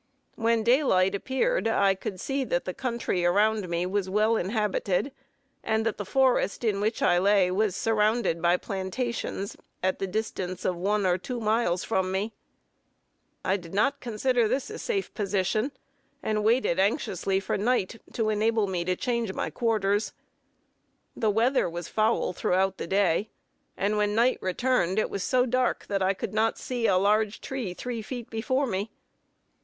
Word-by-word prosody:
When 230 0 +1
daylight 225 -7 +3
appeared, 265 - 0
I 200 -3 +3
could 190 0 -6
see 270 +6 -1
that 175 -7 -1
the 185 - -3
country 235 -8 -2
around 205 +2 +2
me 170 +1 0
was 190 0 -1
well 215 +3 +2
inhabited, 210 +3 0 0.5
and 220 0 0
that 225 - -1
the 205 - -3
forest 260 -5 +2
in 205 -3 +1
which 220 +2 0
I 175 - +4
lay 195 -1 +3
was 200 0 +1
surrounded 215 -5 +1
by 175 +1 +4
plantations, 200 +2 -3 0.3
at 185 0 0
the 195 - -1
distance 185 -3 -3
of 180 - +1
one 200 +3 0
or 180 0 +2
two 245 +6 -5
miles 215 -5 +1
from 190 -4 0
me. 200 +4 -2 1.1
I 190 - +2
did 170 -1 -10
not 280 +8 +2
consider 240 0 +1
this 265 - -2
a 445 - -6
safe 405 -5 -2
position, 205 +4 0 0.5
and 215 -1 0
waited 225 -5 +2
anxiously 195 - +1
for 195 - -2
night, 230 0 0
to 220 -2 0
enable 215 0 +2
me 185 -3 -2
to 185 0 +1
change 235 -2 -1
my - - -2
quarters. 210 -3 0 1.0
The 220 - +1
weather 230 +1 +2
was 170 0 -6
foul 215 -3 +1
throughout 190 +2 0
the - - -4
day; 195 +1 +2 0.5
and 205 +2 0
when 210 0 +1
night 240 +3 +3
returned, 190 -1 +1
it 215 - +1
was 200 - -3
so 255 -1 +2
dark 255 0 0
that 200 -1 0
I 190 +1 +2
could 190 - -5
not 220 +1 +1
see 245 -3 -1
a 185 - +4
large 210 +2 +2
tree 245 -9 -4
three 240 +1 -4
feet 240 +1 -7
before 260 +5 0
me. 205 -2 -2
210 Hz, 170 wpm, -27 LUFS, 190-230 Hz, 1.1 s, I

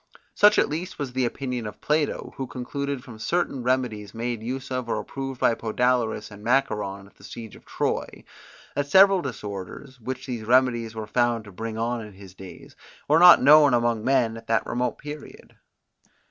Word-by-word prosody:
Such 210 +1 +5
at - - +4
least 170 +5 -5
was 135 -4 -5
the 130 0 +1
opinion 125 -2 -4
of 105 - -9
Plato, 150 0 -1
who 135 - -4
concluded 140 +2 -4
from 115 -5 -12
certain 140 0 -1
remedies 120 -5 -1
made 120 0 -3
use 130 +3 -5
of 125 -2 -3
or - - 0
approved 135 -2 -6
by - - +3
Podalyrus 115 -1 -1
and 105 0 -12
Macaon 105 -6 0
at 100 - -20
the - - -19
Siege 110 +1 -9
of - - -17
Troy, - - -3 0.5
that 145 0 -1
several 195 +2 +6
disorders, 120 - -7
which 130 +3 -6
these 120 -4 -4
remedies 120 -1 +2
were 110 -1 -5
found 120 0 0
to 100 - -12
bring 110 +3 -6
on 115 +1 -1
in 105 -2 -10
his 95 -1 -13
days, 95 -1 -12 0.3
were 155 +3 +4
not 175 -4 +8
known 145 -1 +7
among 120 -2 0
men 125 -4 +1
at 115 - -13
that 115 - +1
remote 125 0 -2
period. 150 0 -10
125 Hz, 185 wpm, -25 LUFS, 110-135 Hz, 0.5 s, not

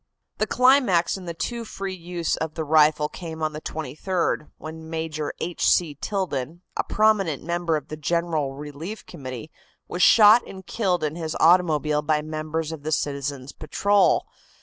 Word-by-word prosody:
The - - +1
climax 250 -10 +4
in 190 -2 -8
the 170 -1 -5
too 235 +7 -3
free 195 -3 -5
use 175 -2 -2
of 160 -1 -4
the 160 - -2
rifle 150 0 +4
came 160 -1 -7
on 155 0 -1
the 155 - -6
23d, 155 +3 -2
when 160 0 -9
Major 160 -2 -3
H. 175 - -1
C. 165 -4 +2
Tilden, 165 -2 -3
a - - 0
prominent 210 -9 +2
member 170 -1 -1
of 145 - -9
the 155 - -6
General 155 -3 -1
Relief 150 +8 -7
Committee, 135 -2 -8 0.4
was 175 - -4
shot 220 +3 +8
and 190 -1 -10
killed 180 -5 0
in 155 0 -1
his 160 -2 -4
automobile 155 -4 +4
by 150 0 0
members 155 +1 -3
of 160 -3 -7
the 155 +2 -4
citizens' 140 -2 -2
patrol. 200 +6 +2
160 Hz, 165 wpm, -24 LUFS, 150-180 Hz, 0.4 s, shot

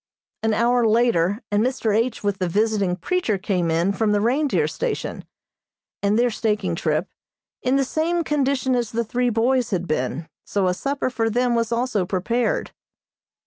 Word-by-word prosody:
An 220 -1 +1
hour 240 +1 +3
later 220 -3 +2
and 205 +1 +2
Mr. 240 -4 0
H. 230 +1 0
with 205 -1 -1
the 180 -2 0
visiting 205 -1 +1
preacher 220 - -1
came 185 -3 -1
in 170 +4 +1
from 210 +1 +1
the 205 - +2
reindeer 265 +7 +1
station, 485 -2 -4 0.8
and 205 +1 +2
their 240 0 +3
staking 210 -5 -1
trip, 160 +2 -1 0.5
in 255 +1 +1
the 275 - +3
same 335 +5 0
condition 275 -3 0
as 240 -3 -1
the 235 +1 0
three 245 +3 0
boys 240 +2 +1
had 180 -4 -2
been; 150 +2 -2 0.2
so 200 -2 -1
a 180 - +2
supper 275 +6 -2
for 225 -1 0
them 245 +2 +1
was 230 -1 0
also 235 -4 0
prepared. 230 +6 -1
225 Hz, 170 wpm, -22 LUFS, 195-250 Hz, 0.8 s, hour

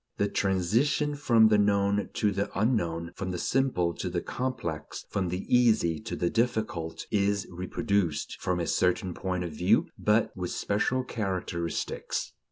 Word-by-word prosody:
The 100 - +2
transition 115 - +1
from 115 -6 +4
the 105 -1 +4
known 100 0 +2
to 105 -2 +1
the 100 +1 -1
unknown, 85 -8 0
from 95 - -4
the 90 - -3
simple 90 -7 +1
to - - -2
the 90 0 -1
complex, 85 - -4
from 95 -2 0
the 90 +2 -3
easy 110 -10 +3
to 110 0 -5
the 85 - 0
difficult, 110 -8 -1
is 100 -1 +1
reproduced, 90 -1 -1
from 90 -1 0
a 85 - -1
certain 90 +3 +1
point 90 -1 -2
of 85 - -4
view; 90 +8 +2
but 105 +1 +2
with 90 -1 -3
special 125 +5 0
characteristics. 95 -7 -3
100 Hz, 155 wpm, -28 LUFS, 90-110 Hz, -, from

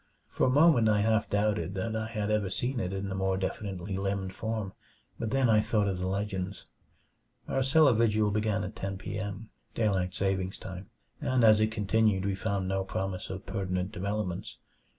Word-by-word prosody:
For - - +1
a - - +3
moment 140 -5 +5
I 105 -1 +3
half 110 0 +2
doubted 105 -2 0
that 110 +4 -2
I 110 0 -2
had 105 -2 -2
ever 105 -3 +1
seen 120 +6 -1
it 90 -4 -2
in 95 0 -3
the 95 - -3
more 95 0 0
definitely 95 0 -3
limned 95 -1 -2
form 110 -3 -3 0.5
but 115 - -2
then 135 0 +2
I 110 -2 +5
thought 105 -1 +1
of 95 -2 -1
the 90 - -2
legends. 95 -1 -3 0.8
Our 135 - 0
cellar 140 +1 +5
vigil 110 -2 +2
began 105 0 0
at - - -6
ten 95 0 -4
p. 105 +2 -5
m., 105 +2 -6 0.2
daylight 95 -5 0
saving 95 -1 0
time, 95 +1 -8 0.3
and 130 -2 +1
as 110 -1 +7
it 110 0 +3
continued 105 -2 +2
we 100 - +1
found 100 -1 -2
no 95 0 0
promise 95 -1 -4
of 95 0 -6
pertinent 95 -1 -2
developments. 100 -2 -3
100 Hz, 190 wpm, -29 LUFS, 95-110 Hz, 0.8 s, as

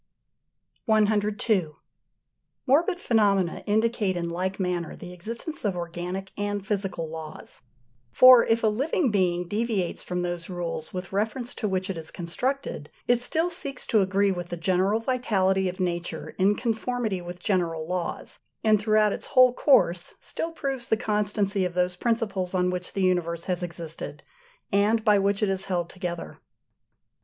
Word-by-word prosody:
102. 210 -5 +2 0.9
Morbid 335 +7 +3
phenomena 200 - +2
indicate 215 -3 +1
in 170 -1 -2
like 185 +3 -2
manner 180 -3 -2
the 180 0 -9
existence 230 - -5
of 200 -4 0
organic 175 +2 -5
and 205 -1 -2
physical 195 -5 -2
laws: 155 -1 -8 0.5
for 255 -2 +9
if 230 0 +1
a - - +5
living 270 +5 +1
being 180 -3 +1
deviates 205 -3 -1
from 180 0 -3
those 175 0 -4
rules 170 -3 -4
with 180 0 -6
reference 225 +5 -1
to 215 - -2
which 190 -1 -1
it 190 - -4
is 160 -1 -6
constructed, 180 - -3 0.2
it 245 0 +4
still 320 +7 +1
seeks 280 -6 -5
to 220 - +3
agree 195 +1 +2
with 175 -1 -4
the 175 - -4
general 185 +5 +2
vitality 195 -6 +1
of 180 - -8
nature 175 -1 -2
in 200 +2 +4
conformity 225 -3 -1
with 175 0 -8
general 170 -4 0
laws, 180 -1 -3 0.2
and 215 -2 +4
throughout 215 -1 +3
its - - -6
whole 255 -1 +6
course 185 - +3
still 330 - -4
proves 270 -6 -4
the 220 - +2
constancy 210 -3 0
of 180 -1 -2
those 180 0 +1
principles 200 -4 -1
on 180 0 +2
which 180 0 -4
the 195 - 0
universe 170 -2 +1
has 180 -1 -2
existed, 170 -2 -6 0.5
and 215 +3 +3
by 210 -2 +5
which 200 +1 +1
it 205 - +2
is 195 0 0
held 175 -3 -2
together. 175 -2 -5
195 Hz, 155 wpm, -26 LUFS, 180-220 Hz, 0.9 s, for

